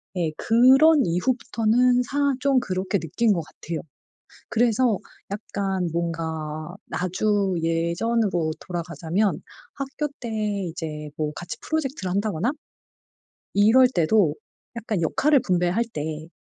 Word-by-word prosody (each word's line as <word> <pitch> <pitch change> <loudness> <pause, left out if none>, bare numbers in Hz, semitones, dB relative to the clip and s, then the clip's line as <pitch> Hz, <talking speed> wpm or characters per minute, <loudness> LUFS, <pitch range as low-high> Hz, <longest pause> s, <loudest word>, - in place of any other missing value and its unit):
네. 170 -3 0
그런 265 +6 +5
이후부터는 240 +5 +2
사 280 +2 +1
좀 275 -1 +3
그렇게 190 -2 -1
느낀 205 +8 +1
것 170 - -1
같아요. 160 +1 -6 0.7
그래서 235 -1 +2 0.3
약간 195 -3 -2
뭔가 160 -1 -3 0.2
아주 195 +1 0
예전으로 170 +2 0
돌아가자면 175 +3 -2 0.3
학교 275 +2 -3
때 240 - -5 0.4
이제 150 -2 -6
뭐 150 -1 -1
같이 175 - -6
프로젝트를 270 - -2
한다거나 200 +2 0 1.0
이럴 225 +6 +6
때도 175 - +2 0.4
약간 215 -5 -2
역할을 280 - +3
분배할 180 +1 +1
때 155 +1 -4
195 Hz, 245 characters per minute, -24 LUFS, 165-240 Hz, 1.0 s, 이럴